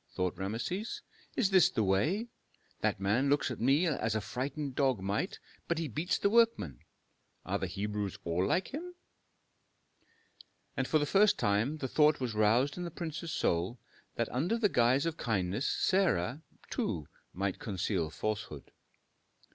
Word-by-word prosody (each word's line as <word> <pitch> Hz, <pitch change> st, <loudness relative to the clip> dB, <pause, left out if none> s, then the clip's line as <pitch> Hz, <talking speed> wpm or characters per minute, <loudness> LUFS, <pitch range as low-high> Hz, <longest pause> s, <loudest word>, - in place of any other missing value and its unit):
thought 90 Hz, -1 st, -2 dB
Rameses. 115 Hz, -, -3 dB, 0.3 s
"Is 200 Hz, -6 st, +2 dB
this 185 Hz, -4 st, +6 dB
the 110 Hz, -, 0 dB
way? 145 Hz, -, +1 dB, 0.5 s
That -, -, 0 dB
man 110 Hz, +8 st, +2 dB
looks 145 Hz, -2 st, +2 dB
at 120 Hz, -, -5 dB
me 140 Hz, +8 st, +4 dB
as 135 Hz, -9 st, 0 dB
a -, -, +2 dB
frightened 135 Hz, +6 st, -4 dB
dog 130 Hz, -4 st, +2 dB
might, 100 Hz, +2 st, -2 dB, 0.3 s
but 170 Hz, -, 0 dB
he 165 Hz, -1 st, -1 dB
beats 155 Hz, -, -1 dB
the -, -, +2 dB
workmen. 225 Hz, -, +3 dB, 0.7 s
Are -, -, -1 dB
the 95 Hz, -, -2 dB
Hebrews 100 Hz, +1 st, -3 dB
all 85 Hz, +2 st, 0 dB
like 185 Hz, -, +1 dB
him?" 355 Hz, +5 st, -6 dB, 1.8 s
And 135 Hz, -2 st, -1 dB
for 155 Hz, -, +3 dB
the 145 Hz, -, +1 dB
first 200 Hz, +6 st, +4 dB
time 105 Hz, +9 st, +1 dB
the 135 Hz, -, -3 dB
thought 150 Hz, +3 st, +4 dB
was 125 Hz, -4 st, -2 dB
roused 115 Hz, +8 st, +3 dB
in 180 Hz, -, -3 dB
the 175 Hz, -, -3 dB
prince's 165 Hz, 0 st, -5 dB
soul, 90 Hz, +4 st, 0 dB, 0.4 s
that 115 Hz, -, 0 dB
under 165 Hz, -, +1 dB
the 215 Hz, -3 st, +2 dB
guise 125 Hz, +2 st, +3 dB
of 165 Hz, -1 st, -2 dB
kindness 105 Hz, +1 st, -1 dB
Sarah, 160 Hz, -, +1 dB, 0.3 s
too, 75 Hz, -, -2 dB, 0.2 s
might 95 Hz, +1 st, -2 dB
conceal 95 Hz, -4 st, -1 dB
falsehood. 105 Hz, -3 st, -4 dB
125 Hz, 155 wpm, -32 LUFS, 100-160 Hz, 1.8 s, this